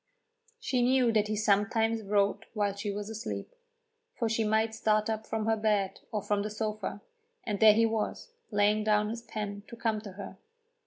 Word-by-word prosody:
She 260 Hz, -, 0 dB
knew 250 Hz, -1 st, +4 dB
that 215 Hz, -1 st, +2 dB
he 215 Hz, -, -1 dB
sometimes 220 Hz, +2 st, +2 dB
wrote 200 Hz, -1 st, +1 dB
while 205 Hz, -2 st, 0 dB
she 205 Hz, +1 st, -4 dB
was 205 Hz, 0 st, -4 dB
asleep, 220 Hz, -, -5 dB, 0.6 s
for 230 Hz, -, 0 dB
she 225 Hz, 0 st, +1 dB
might 220 Hz, +1 st, +1 dB
start 215 Hz, 0 st, +1 dB
up 220 Hz, 0 st, -4 dB
from 220 Hz, -1 st, -2 dB
her 225 Hz, 0 st, +3 dB
bed 210 Hz, -3 st, 0 dB
or 210 Hz, -3 st, -2 dB
from 205 Hz, -1 st, 0 dB
the 210 Hz, -, -3 dB
sofa, 215 Hz, 0 st, -4 dB, 0.4 s
and 205 Hz, -3 st, -2 dB
there 220 Hz, -1 st, +8 dB
he 225 Hz, +2 st, +4 dB
was, 225 Hz, -, -2 dB, 0.2 s
laying 210 Hz, 0 st, +2 dB
down 210 Hz, 0 st, +2 dB
his 230 Hz, +1 st, -5 dB
pen 205 Hz, -3 st, -5 dB
to -, -, -9 dB
come 225 Hz, -2 st, -1 dB
to 205 Hz, -3 st, -9 dB
her. 190 Hz, 0 st, -9 dB
215 Hz, 190 wpm, -30 LUFS, 205-225 Hz, 0.6 s, there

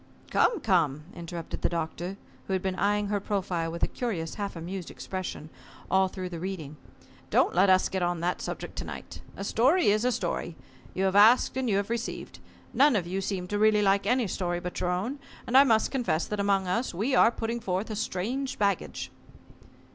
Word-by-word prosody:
"Come, 440 Hz, -9 st, +3 dB
come," 160 Hz, -, +2 dB
interrupted 170 Hz, -1 st, -6 dB
the -, -, +2 dB
Doctor, 170 Hz, +3 st, -4 dB, 0.3 s
who 190 Hz, -, -1 dB
had 185 Hz, -, 0 dB
been 190 Hz, -1 st, 0 dB
eyeing 205 Hz, +2 st, +1 dB
her 205 Hz, -1 st, +1 dB
profile 185 Hz, -5 st, -2 dB
with 170 Hz, -, -5 dB
a -, -, +4 dB
curious 185 Hz, -10 st, -3 dB
half 200 Hz, -2 st, -4 dB
amused 175 Hz, +2 st, -6 dB
expression, 185 Hz, -4 st, -6 dB, 0.4 s
all 190 Hz, +1 st, +4 dB
through 185 Hz, -1 st, -6 dB
the 170 Hz, -2 st, -6 dB
reading: 165 Hz, -5 st, -5 dB, 0.5 s
"Don't -, -, +3 dB
let 190 Hz, +3 st, +4 dB
us 185 Hz, 0 st, +5 dB
get 190 Hz, -, -3 dB
on 175 Hz, -1 st, 0 dB
that 175 Hz, +2 st, -1 dB
subject -, -, -5 dB
to -, -, -2 dB
night. -, -, -8 dB, 0.2 s
A -, -, -4 dB
story 265 Hz, -, +3 dB
is 215 Hz, +2 st, +1 dB
a 250 Hz, -, +2 dB
story. 175 Hz, -5 st, -2 dB, 0.4 s
You 190 Hz, -, 0 dB
have 190 Hz, 0 st, +1 dB
asked, 220 Hz, +6 st, +6 dB
and 260 Hz, -2 st, -1 dB
you 200 Hz, -, +2 dB
have 200 Hz, +2 st, -2 dB
received. 235 Hz, -1 st, -4 dB, 0.3 s
None 275 Hz, +2 st, +5 dB
of 190 Hz, -5 st, 0 dB
you 190 Hz, +3 st, -2 dB
seem 190 Hz, -2 st, -3 dB
to 205 Hz, -, -1 dB
really 215 Hz, -1 st, +4 dB
like 200 Hz, 0 st, +2 dB
any 245 Hz, +1 st, +3 dB
story 175 Hz, -2 st, -2 dB
but 180 Hz, 0 st, -5 dB
your 180 Hz, -, 0 dB
own, 205 Hz, +11 st, -2 dB, 0.3 s
and 240 Hz, -, -2 dB
I 270 Hz, -, +10 dB
must 225 Hz, -5 st, +3 dB
confess 235 Hz, -, 0 dB
that 210 Hz, -, -4 dB
among 200 Hz, -1 st, +2 dB
us, 230 Hz, +1 st, -1 dB
we 225 Hz, +9 st, 0 dB
are 230 Hz, -, +6 dB
putting 230 Hz, 0 st, -3 dB
forth 195 Hz, +1 st, -2 dB
a -, -, -3 dB
strange 240 Hz, +7 st, -2 dB
baggage." 200 Hz, -3 st, -1 dB
195 Hz, 205 wpm, -28 LUFS, 180-220 Hz, 0.5 s, I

